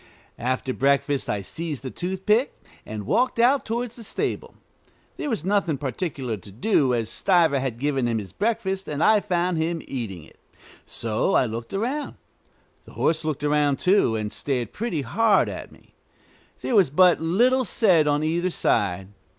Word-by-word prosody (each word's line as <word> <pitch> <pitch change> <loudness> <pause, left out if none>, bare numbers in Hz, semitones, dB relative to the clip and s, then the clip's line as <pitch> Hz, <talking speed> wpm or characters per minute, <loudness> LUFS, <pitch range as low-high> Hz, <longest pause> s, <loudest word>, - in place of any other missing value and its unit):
After 130 +1 -1
breakfast 140 +1 +1
I 100 -1 -1
seized 150 - -5
a 130 - -4
toothpick 190 +7 0 0.3
and 105 -2 -6
walked 250 - +1
out 255 +4 +4
towards 235 +1 -3
the 235 - -10
stable. - - -3 0.6
There 295 - -3
was 215 - -2
nothing 190 -7 +1
particular 130 -3 -3
to 100 +1 -13
do, 130 - +1
as 115 -2 -1
Stiver 165 - +2
had 130 -3 -3
given 135 -1 0
him 115 -1 0
his 100 -4 -6
breakfast, 195 - -2
and 150 +1 -2
I 215 -1 +5
found 180 -3 -1
him 165 0 -2
eating 105 - -5
it; - - -19 0.5
so 115 - -1
I - - +4
looked 115 0 -6
around. 255 +9 -2 0.7
The - - -15
horse 160 0 +1
looked 150 -2 -3
around, 145 -1 +2
too, 180 - +3
and 105 -1 -3
stared 120 +1 -3
pretty 185 -9 -2
hard 200 - +3
at - - -7
me. - - -21 0.7
There - - -2
was 195 -8 +5
but 180 +4 +4
little 240 +11 +3
said 180 -11 +3
on 145 +1 +1
either 170 +3 0
side. 95 - 0
155 Hz, 165 wpm, -24 LUFS, 125-195 Hz, 0.7 s, I